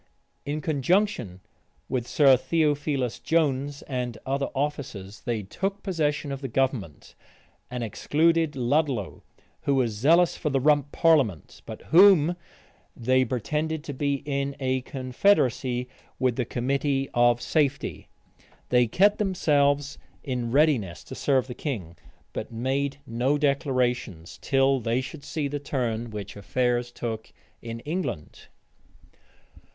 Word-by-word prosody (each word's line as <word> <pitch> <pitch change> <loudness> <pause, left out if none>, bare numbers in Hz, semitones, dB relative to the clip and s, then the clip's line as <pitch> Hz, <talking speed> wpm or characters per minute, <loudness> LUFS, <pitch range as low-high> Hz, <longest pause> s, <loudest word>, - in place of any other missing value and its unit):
In 150 +2 -2
conjunction 150 - 0 0.5
with 125 -2 -2
Sir 140 -3 +6
Theophilus 145 -2 0
Jones 145 -3 0
and 125 -4 -4
other 140 +1 -1
officers, 135 -9 -4
they 115 -3 -1
took 195 - -4
possession 150 -6 -1
of 135 0 -5
the 135 - -3
government, 125 - -2 0.6
and 125 -1 -4
excluded 160 +7 +1
Ludlow, 130 - 0 0.4
who 140 - +1
was 125 -4 +2
zealous 160 +11 +3
for 150 - -2
the 135 -1 +1
rump 145 0 +2
parliament, 135 - +2
but - - -8
whom 175 -2 +7 0.6
they, 130 +2 +3
pretended 150 +6 -2
to 145 - -6
be 140 0 -1
in 140 -1 -2
a 130 -1 0
confederacy 130 - +1 0.3
with 130 -2 +1
the 125 - -1
committee 135 +3 -1
of 120 0 +4
safety. 140 0 -1 0.6
They 125 -1 +4
kept 200 - +3
themselves 145 -7 +1 0.2
in 125 -3 -2
readiness 120 - +2
to - - -10
serve 130 -3 +1
the 125 - -7
king; 105 - -5 0.4
but - - -5
made 135 +4 -1
no 125 +4 0
declarations, 130 - -1
till 135 0 +2
they 115 +1 0
should 140 +3 -7
see 150 -3 -2
the 145 +1 -3
turn 120 -5 -2
which 105 -2 -7
affairs 120 +3 -1
took 115 -2 -5 0.3
in 115 0 -6
England. 140 - -5
135 Hz, 125 wpm, -26 LUFS, 120-150 Hz, 0.6 s, whom